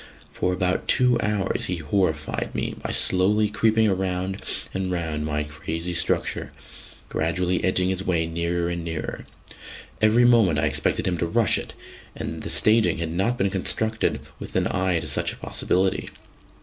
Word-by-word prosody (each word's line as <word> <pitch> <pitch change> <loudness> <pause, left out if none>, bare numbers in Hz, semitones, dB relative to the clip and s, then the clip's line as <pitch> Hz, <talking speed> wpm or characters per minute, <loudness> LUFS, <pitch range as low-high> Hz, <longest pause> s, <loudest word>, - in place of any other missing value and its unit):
For 90 - -1
about 90 0 0
two 125 -2 +3
hours 105 -3 -1
he 90 - -1
horrified 80 -1 -1
me - - -2
by - - -4
slowly 105 +3 +4
creeping 110 +1 +3
round 95 +1 -2 0.3
and 95 -1 -2
round 80 -4 -2
my 75 -1 -1
crazy 80 +3 -5
structure, 85 -1 -1 0.6
gradually 90 +3 0
edging 95 0 +2
his 95 0 -2
way 85 -4 +1
nearer 85 +1 -1
and 85 -1 -3
nearer. 80 -1 -5 0.7
Every 110 +3 +5
moment 115 -10 +5
I 75 - +2
expected 75 - 0
him 90 -3 -1
to 85 - 0
rush 115 +5 +3
it; - - -8 0.4
and - - -5
the - - -5
staging 105 -5 +3
had 80 -1 -3
not 95 +8 0
been 95 -2 +1
constructed 110 +3 0 0.2
with - - -7
an - - +2
eye 95 -1 +1
to - - -7
such - - -1
a - - -12
possibility. 95 +1 0
90 Hz, 160 wpm, -24 LUFS, 85-100 Hz, 0.7 s, Every